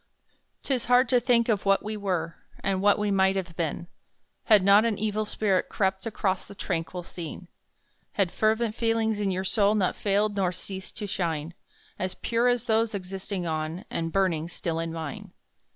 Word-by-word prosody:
'Tis 260 Hz, -4 st, 0 dB
hard 250 Hz, +1 st, +5 dB
to 250 Hz, -1 st, +4 dB
think 240 Hz, -1 st, +3 dB
of 210 Hz, -4 st, +1 dB
what 195 Hz, 0 st, +3 dB
we 215 Hz, +1 st, -4 dB
were, 180 Hz, -5 st, -2 dB, 0.3 s
And 190 Hz, -1 st, 0 dB
what 205 Hz, 0 st, +4 dB
we 210 Hz, -1 st, 0 dB
might 190 Hz, 0 st, +3 dB
have 180 Hz, -3 st, -4 dB
been, 165 Hz, 0 st, -2 dB, 0.6 s
Had 210 Hz, -6 st, +6 dB
not 200 Hz, +2 st, +6 dB
an 230 Hz, -3 st, 0 dB
evil 215 Hz, +1 st, -1 dB
spirit 200 Hz, -3 st, 0 dB
crept 190 Hz, +1 st, -1 dB
Across 195 Hz, -4 st, -1 dB
the 200 Hz, -, -11 dB
tranquil 175 Hz, -1 st, -3 dB
scene: 170 Hz, +1 st, -8 dB, 0.7 s
Had 195 Hz, -4 st, +1 dB
fervent 220 Hz, +1 st, +1 dB
feelings 225 Hz, -2 st, 0 dB
in 205 Hz, -1 st, 0 dB
your 185 Hz, 0 st, -1 dB
soul 205 Hz, +1 st, +2 dB
Not 190 Hz, -4 st, +1 dB
failed 205 Hz, +1 st, +1 dB
nor 190 Hz, -3 st, +1 dB
ceased 190 Hz, +1 st, -7 dB
to 210 Hz, -, -3 dB
shine 170 Hz, -5 st, -2 dB, 0.5 s
As 185 Hz, 0 st, -2 dB
pure 235 Hz, +1 st, +1 dB
as 245 Hz, -2 st, +2 dB
those 225 Hz, -1 st, +1 dB
existing 190 Hz, 0 st, -4 dB
on, 160 Hz, +2 st, -3 dB
And 165 Hz, 0 st, -2 dB
burning 170 Hz, -4 st, +1 dB
still 165 Hz, -1 st, -3 dB
in 165 Hz, 0 st, -2 dB
mine. 160 Hz, -3 st, -6 dB
195 Hz, 180 wpm, -27 LUFS, 180-215 Hz, 0.7 s, Had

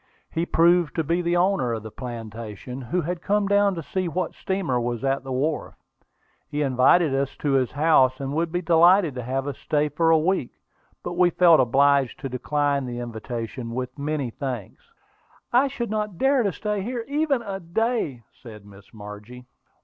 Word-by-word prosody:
He 165 Hz, +1 st, -1 dB
proved 170 Hz, 0 st, +3 dB
to 165 Hz, -, 0 dB
be 170 Hz, +4 st, 0 dB
the 175 Hz, 0 st, +1 dB
owner 175 Hz, -10 st, +1 dB
of 110 Hz, -2 st, -4 dB
the 110 Hz, -, -8 dB
plantation, 115 Hz, +1 st, -7 dB
who 130 Hz, +9 st, -1 dB
had 170 Hz, +2 st, -4 dB
come 205 Hz, +1 st, +1 dB
down 200 Hz, -1 st, +3 dB
to 165 Hz, -, -5 dB
see 185 Hz, +4 st, -2 dB
what 180 Hz, +3 st, -2 dB
steamer 190 Hz, -10 st, -1 dB
was 120 Hz, +1 st, -3 dB
at 135 Hz, 0 st, 0 dB
the 135 Hz, -, -7 dB
wharf. 145 Hz, +4 st, -2 dB, 0.7 s
He 150 Hz, 0 st, -1 dB
invited 135 Hz, +4 st, +4 dB
us 135 Hz, 0 st, -1 dB
to 145 Hz, -, -1 dB
his 130 Hz, -2 st, +2 dB
house, 135 Hz, -4 st, +3 dB
and 135 Hz, 0 st, -4 dB
would 165 Hz, +2 st, -1 dB
be 175 Hz, +1 st, -2 dB
delighted 170 Hz, 0 st, +5 dB
to 125 Hz, -, -5 dB
have 130 Hz, +3 st, -2 dB
us 140 Hz, -, -5 dB
stay 150 Hz, 0 st, 0 dB
a 165 Hz, 0 st, +4 dB
week; 160 Hz, -5 st, 0 dB, 0.5 s
but -, -, -4 dB
we 175 Hz, 0 st, +4 dB
felt 170 Hz, -2 st, +5 dB
obliged 135 Hz, +1 st, +3 dB
to 135 Hz, -, -4 dB
decline 140 Hz, +1 st, -1 dB
the 120 Hz, -1 st, -5 dB
invitation 115 Hz, 0 st, -5 dB
with 125 Hz, 0 st, -4 dB
many 145 Hz, -4 st, -2 dB
thanks. 125 Hz, -6 st, -6 dB, 0.6 s
"I 255 Hz, +3 st, +5 dB
should 245 Hz, -5 st, -4 dB
not 210 Hz, -4 st, -2 dB
dare 270 Hz, +4 st, +3 dB
to 200 Hz, -4 st, +1 dB
stay 210 Hz, +2 st, -3 dB
here 235 Hz, +2 st, -4 dB
even 285 Hz, -3 st, 0 dB
a 195 Hz, -3 st, -5 dB
day," 175 Hz, -, -1 dB
said 105 Hz, -4 st, -13 dB
Miss 100 Hz, 0 st, -16 dB
Margie. 105 Hz, +4 st, -10 dB
150 Hz, 185 wpm, -24 LUFS, 125-180 Hz, 0.7 s, delighted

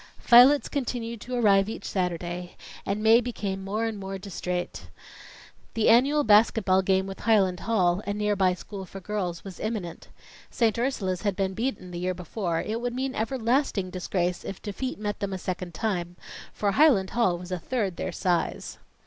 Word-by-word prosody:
Violets 250 Hz, +4 st, +7 dB
continued 235 Hz, -5 st, -3 dB
to 250 Hz, +1 st, -5 dB
arrive 200 Hz, -4 st, +4 dB
each 225 Hz, -, -7 dB
Saturday, 175 Hz, -1 st, -3 dB, 0.3 s
and 205 Hz, +2 st, -1 dB
Mae 225 Hz, +2 st, +6 dB
became 200 Hz, -5 st, -4 dB
more 210 Hz, +4 st, -2 dB
and 220 Hz, -2 st, -3 dB
more 195 Hz, 0 st, -5 dB
distrait. 180 Hz, -2 st, -5 dB, 0.9 s
The 225 Hz, -, +3 dB
annual 275 Hz, +6 st, +5 dB
basket 215 Hz, 0 st, +4 dB
ball 185 Hz, 0 st, +4 dB
game 190 Hz, 0 st, +1 dB
with 195 Hz, 0 st, -7 dB
Highland 195 Hz, -5 st, +2 dB
Hall, 185 Hz, -5 st, +1 dB
a -, -, 0 dB
near 210 Hz, 0 st, 0 dB
by 185 Hz, -2 st, +2 dB
school 195 Hz, +2 st, -8 dB
for 195 Hz, -, -9 dB
girls, 185 Hz, -3 st, -3 dB
was 195 Hz, -2 st, -9 dB
imminent. 215 Hz, -6 st, -4 dB, 0.4 s
St. 230 Hz, -2 st, +1 dB
Ursula's 200 Hz, -8 st, -1 dB
had 205 Hz, -3 st, 0 dB
been 190 Hz, -1 st, -1 dB
beaten 225 Hz, -4 st, -3 dB
the 175 Hz, -, -5 dB
year 185 Hz, +1 st, -1 dB
before; 175 Hz, -1 st, -3 dB
it 225 Hz, +2 st, -3 dB
would 245 Hz, 0 st, -3 dB
mean 260 Hz, +1 st, -2 dB
everlasting 230 Hz, -4 st, 0 dB
disgrace 180 Hz, -1 st, -2 dB
if 195 Hz, -, -6 dB
defeat 240 Hz, +5 st, -4 dB
met 205 Hz, 0 st, -4 dB
them 200 Hz, -1 st, -3 dB
a -, -, -2 dB
second 180 Hz, -2 st, -5 dB
time, 175 Hz, -5 st, -2 dB, 0.4 s
for 205 Hz, -1 st, 0 dB
Highland 240 Hz, -7 st, +4 dB
Hall 230 Hz, -7 st, +2 dB
was 180 Hz, +1 st, -10 dB
a 180 Hz, -, -2 dB
third 200 Hz, -3 st, -2 dB
their -, -, -3 dB
size. 175 Hz, -3 st, -2 dB
200 Hz, 180 wpm, -26 LUFS, 185-230 Hz, 0.9 s, Violets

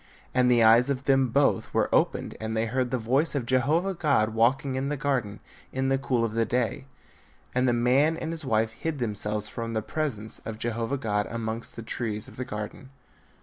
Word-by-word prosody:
And 125 Hz, -1 st, +3 dB
the 120 Hz, -2 st, +5 dB
eyes 115 Hz, +4 st, +6 dB
of 135 Hz, -1 st, -1 dB
them 135 Hz, -1 st, +3 dB
both 140 Hz, +4 st, +1 dB
were -, -, +3 dB
opened -, -, +1 dB
and 110 Hz, 0 st, -2 dB
they 110 Hz, -, +1 dB
beard 125 Hz, +2 st, -1 dB
the 130 Hz, -, 0 dB
voice 130 Hz, +8 st, +1 dB
of 135 Hz, -4 st, -1 dB
Jehovah 150 Hz, +10 st, +2 dB
God 140 Hz, -10 st, +2 dB
walking 125 Hz, +5 st, +2 dB
in 135 Hz, +1 st, -1 dB
the 150 Hz, -, -2 dB
garden 125 Hz, -7 st, -1 dB, 0.3 s
in 130 Hz, 0 st, -1 dB
the 135 Hz, 0 st, +2 dB
cool 125 Hz, -3 st, +1 dB
of 110 Hz, -, -4 dB
the 115 Hz, 0 st, +2 dB
day: 125 Hz, +4 st, -1 dB, 0.7 s
and 125 Hz, +1 st, +2 dB
the 120 Hz, -, +3 dB
man 130 Hz, +7 st, +3 dB
and 160 Hz, -, -4 dB
his 165 Hz, -1 st, -5 dB
wife 110 Hz, -3 st, +1 dB
hid 155 Hz, +6 st, -4 dB
themselves 105 Hz, -3 st, -1 dB
from 115 Hz, +1 st, -5 dB
the 110 Hz, -, -1 dB
presence 110 Hz, -5 st, -3 dB
of 110 Hz, -1 st, -7 dB
Jehovah 115 Hz, +3 st, -2 dB
God 105 Hz, -5 st, -1 dB
amongst 115 Hz, 0 st, -4 dB
the 115 Hz, -, -7 dB
trees 110 Hz, -2 st, -4 dB
of -, -, -13 dB
the 130 Hz, -, -3 dB
garden. 105 Hz, +3 st, -6 dB
125 Hz, 205 wpm, -27 LUFS, 110-135 Hz, 0.7 s, eyes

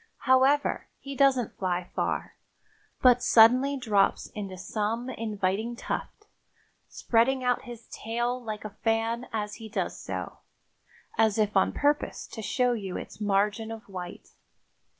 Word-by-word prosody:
However, 270 Hz, +2 st, +3 dB
he 275 Hz, 0 st, -8 dB
doesn't 265 Hz, -4 st, +2 dB
fly 180 Hz, -1 st, -2 dB
far, -, -, -2 dB, 0.7 s
but 250 Hz, -1 st, +6 dB
suddenly 255 Hz, +6 st, +5 dB
drops 210 Hz, -6 st, +1 dB
into 195 Hz, -3 st, -6 dB
some 225 Hz, +6 st, -2 dB
inviting 215 Hz, 0 st, -2 dB
tuft, 420 Hz, -, -5 dB, 0.6 s
spreading 255 Hz, +3 st, +1 dB
out 250 Hz, +1 st, +1 dB
his 235 Hz, -2 st, -9 dB
tail 240 Hz, +2 st, -2 dB
like 215 Hz, -2 st, -5 dB
a 210 Hz, -1 st, -7 dB
fan 225 Hz, +2 st, 0 dB
as 210 Hz, -2 st, -3 dB
he 225 Hz, -1 st, -9 dB
does -, -, -2 dB
so, -, -, -6 dB, 0.8 s
as 220 Hz, -2 st, +4 dB
if 210 Hz, -1 st, +1 dB
on 190 Hz, -, +4 dB
purpose 290 Hz, +1 st, 0 dB
to 220 Hz, -, -7 dB
show 250 Hz, +3 st, +1 dB
you 195 Hz, -5 st, -4 dB
its -, -, -9 dB
margin 210 Hz, +2 st, +1 dB
of 225 Hz, -1 st, -7 dB
white. 180 Hz, -3 st, -8 dB
225 Hz, 135 wpm, -28 LUFS, 210-250 Hz, 0.8 s, but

